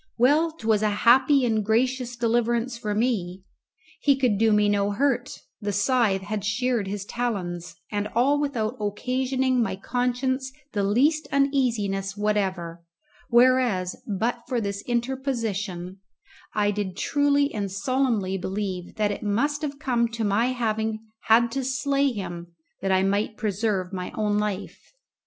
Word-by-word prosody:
Well, 295 +7 +4
'twas 220 -8 +1
a 215 - +2 0.2
happy 265 +3 +6
and 220 -2 +1
gracious 245 +3 0
deliverance 235 +1 0
for 210 -3 -3
me. 195 -6 -1 0.6
He 280 -2 +4
could 250 -7 +1
do 225 0 +4
me 210 0 +4
no 205 0 +2
hurt; 245 +3 0 0.2
the 205 0 -1
scythe 205 -1 +2
had 205 0 -3
sheared 225 0 0
his 200 0 -4
talons, 180 -8 -3 0.2
and 205 0 -1
all 275 +5 +3
without 245 -4 -2
occasioning 255 +4 0
my 225 - -1
conscience 250 +5 -1 0.2
the 205 - -1
least 275 +11 +2
uneasiness 230 -9 0
whatever: 190 -5 -1 0.5
whereas, 240 -7 +3
but 225 +4 -1
for 250 -1 0
this 200 -2 -3
interposition, 230 -8 -2 0.6
I 205 -1 +2
did 200 -2 -4
truly 285 +2 +2
and 200 -3 -3
solemnly 205 -2 0
believe 190 -2 -4
that 210 -1 +1
it 205 - -5
must 275 +9 0
have 285 -2 -3
come 245 -5 +1
to 230 -1 -2
my 210 +3 +2
having 220 -3 -1 0.2
had 230 +1 +4
to 270 +2 -2
slay 275 +1 +1
him 175 -5 -7 0.3
that 195 - 0
I 190 0 +3
might 205 +2 0
preserve 200 -3 -1
my 180 -1 -4
own 210 -1 +1
life. 210 - -5
220 Hz, 145 wpm, -25 LUFS, 200-255 Hz, 0.6 s, happy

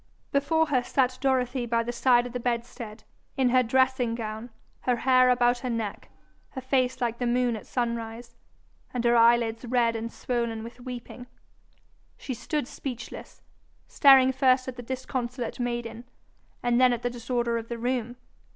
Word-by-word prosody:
Before 320 +3 +2
her 275 -5 +1
sat 255 0 0
Dorothy 255 -2 0
by 230 0 +1
the 240 - -3
side 240 0 +3
of 245 - -7
the 250 - -2
bedstead, 235 -2 -4 0.3
in 260 -2 +3
her 255 +1 +4
dressing 255 -1 +1
gown, 220 +1 -5 0.3
her 250 - +1
hair 255 +1 +4
about 245 0 +3
her 255 - -4
neck, 225 -3 -4 0.4
her 260 - -7
face 255 -1 0
like 235 -1 -2
the 245 - 0
moon 245 -1 +1
at 215 - -9
sunrise, 235 -1 -4 0.6
and 245 - -1
her 240 0 +4
eyelids 230 0 +4
red 235 -1 +1
and 225 +1 -4
swollen 235 -3 -3
with 235 +2 -10
weeping. 245 0 -8 0.9
She 265 - -5
stood 245 +4 -3
speechless, 245 -4 -8 0.4
staring 270 -2 +6
first 260 -1 +2
at 260 - -5
the 245 - -7
disconsolate 250 -1 -4
maiden, 240 -1 -4 0.6
and 240 0 +2
then 250 -1 +5
at 240 - -4
the 245 - -1
disorder 235 -1 -1
of 225 - -9
the 235 - -4
room. 245 0 -2
245 Hz, 165 wpm, -27 LUFS, 235-255 Hz, 0.9 s, staring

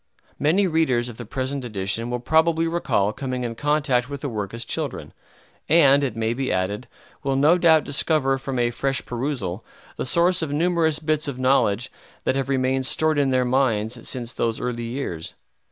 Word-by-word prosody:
Many 175 +7 +3
readers 155 -9 +1
of 115 - -10
the 120 - -8
present 130 +2 -3
edition 110 +1 -2
will 125 - -1
probably 160 +5 +2
recall 110 -11 0
coming 130 -1 -4
in 120 -1 -3
contact 145 -2 0
with 140 -1 -6
the 145 - -3
work 105 -4 -4
as 115 0 -5
children, - - -4 0.6
and, 145 -3 +5
it 125 -5 -2
may 115 0 0
be 130 +2 -2
added, 100 +6 -2 0.3
will 135 -1 -1
no 150 +6 +4
doubt 160 -3 +5
discover 135 -2 +1
from 135 -1 -4
a 120 0 +1
fresh 135 +2 -2
perusal 120 -7 -3 0.3
the - - -2
source 175 +6 +2
of 160 -3 -3
numerous 160 0 +1
bits 155 -1 -1
of 140 -3 -4
knowledge 130 -3 +2 0.3
that - - +1
have 135 0 -2
remained 130 0 +1
stored 155 0 +2
in 140 -1 +2
their 130 -1 +2
minds 120 -3 0
since 125 -2 -3
those 115 -1 -1
early 120 -1 -3
years. 115 - -5
130 Hz, 185 wpm, -23 LUFS, 120-150 Hz, 0.6 s, and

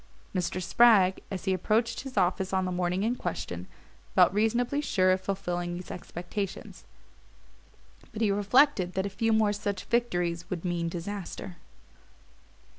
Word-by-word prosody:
Mr. 180 -1 -1
Spragg, 190 +1 +5
as 195 -3 -5
he 190 - +2
approached 220 +5 0
his 270 -1 -8
office 185 +2 +1
on 190 0 +1
the 185 - -2
morning 180 +1 0
in 235 +3 +1
question, 90 - -5 0.5
felt - - +6
reasonably 240 +6 +1
sure 185 -9 +2
of 185 0 +1
fulfilling 175 -3 -3
these 180 +1 -7
expectations; 185 +3 -6 1.3
but 215 - -7
he 210 - +3
reflected 205 -1 +3
that 190 +1 -1
a - - -2
few 225 +4 0
more 215 -2 +3
such 205 -1 -3
victories 175 -8 -1
would 180 -1 -4
mean 170 -1 -1
disaster. 180 0 -6
190 Hz, 145 wpm, -28 LUFS, 180-215 Hz, 1.3 s, felt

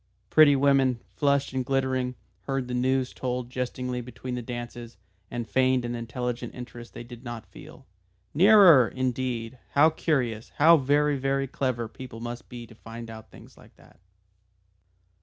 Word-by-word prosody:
Pretty 155 -2 +7
women, 135 -3 +3
flushed 140 -2 +1
and 130 -1 -1
glittering, 130 -1 -1 0.3
heard 135 -2 -2
the 125 - -5
news 130 +1 0
told 125 -1 -4
jestingly 125 0 -3
between 125 +1 -7
the 125 - -3
dances, 120 -1 -7 0.3
and 120 -1 -4
feigned 130 -1 +2
an 120 - -3
intelligent 120 0 -4
interest 120 -1 -10
they - - -7
did 120 0 -12
not 120 -3 -7
feel. - - -14 0.5
"Nearer! 180 - +7
Indeed. 125 -1 -3
How 155 +3 +6
curious! 125 -9 -1
How 165 +3 +7
very, 145 +1 +2
very 135 +1 0
clever 125 -3 -2
people 115 0 -10
must 120 +1 -7
be 120 -1 -8
to 115 - -16
find 115 +1 -9
out 110 0 -11
things - - -16
like - - -19
that!" 85 - -21
125 Hz, 155 wpm, -26 LUFS, 120-135 Hz, 0.5 s, Pretty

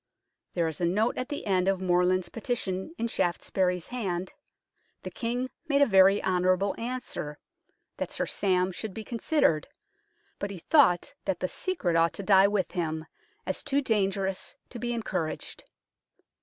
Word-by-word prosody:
There 170 -2 +2
is 160 +1 -4
a - - +3
note 210 +7 +2
at 255 +2 -3
the 290 - -4
end 190 -2 +2
of 195 -1 +2
Morland's 180 0 +2
petition 225 - -3
in 235 - -1
Shaftesbury's 180 -2 0
hand: 190 -7 -3 0.3
" - - -45
The - - -6
King 245 +2 -2 0.2
made 285 -1 +4
a - - +6
very 195 -2 +5
honourable 185 +1 +2
answer, 235 -11 -4 0.6
that - - -3
Sir - - -2
Sam 185 -2 +1
should 200 +2 -6
be 220 - -5
considered, 230 - +1 0.7
but 200 - -2
he 195 - -6
thought 175 - +4
that 190 -3 -1
the 185 - 0
secret 195 - -1
ought 165 0 +3
to 200 - -6
die 195 0 +6
with 200 -2 0
him, 160 -3 -2 0.4
as - - -2
too 280 -2 +1
dangerous 195 -6 -1 0.2
to 240 - -7
be 240 0 -2
encouraged." 215 -9 -3
190 Hz, 160 wpm, -28 LUFS, 180-235 Hz, 0.7 s, a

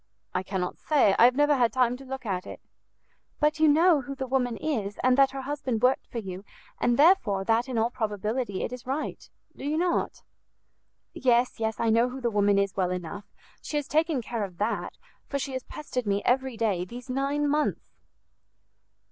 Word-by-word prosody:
"I 185 - 0
cannot 185 -1 -3
say; 275 -10 +3
I 235 - +8
have 250 +1 +5
never 290 +1 +4
had 240 -3 +2
time 250 -2 +2
to 270 - -12
look 265 -1 -6
at 185 -3 -3
it." - - -8 0.8
"But 300 +1 +2
you 315 - +5
know 315 +1 +5
who 275 +2 -7
the 265 -1 -4
woman 250 -3 0
is, 215 -10 -2
and 255 0 +4
that 275 0 +5
her 270 0 -6
husband 265 -5 -3
worked 255 +1 +2
for - - -8
you, 190 -3 -6 0.4
and 240 -1 +2
therefore 285 - +4
that 230 +5 +1
in 250 - -2
all 225 +2 +1
probability 215 -1 -2
it - - -4
is 250 0 -9
right, 275 +4 -4 0.3
do - - -10
you 295 +2 -1
not?" 350 +1 -1 0.9
"Yes, 245 -1 +2
yes, 220 -1 -2
I 230 - +2
know 230 +3 +3
who 260 +2 -7
the 240 -2 -1
woman 205 -1 +3
is 200 0 0
well 185 -2 +1
enough; 180 +3 -5 0.4
she 300 - -3
has 290 - -2
taken 310 -4 +1
care 230 -1 -3
of 185 -3 -7
that, 210 +4 -2 0.3
for 280 - -2
she 275 -1 -4
has 260 -1 -4
pestered 255 -6 -5
me 200 0 0
every 260 -1 +1
day 205 -6 0
these 240 +7 -9
nine 275 +3 0
months." 300 +1 -1
245 Hz, 200 wpm, -27 LUFS, 210-275 Hz, 0.9 s, I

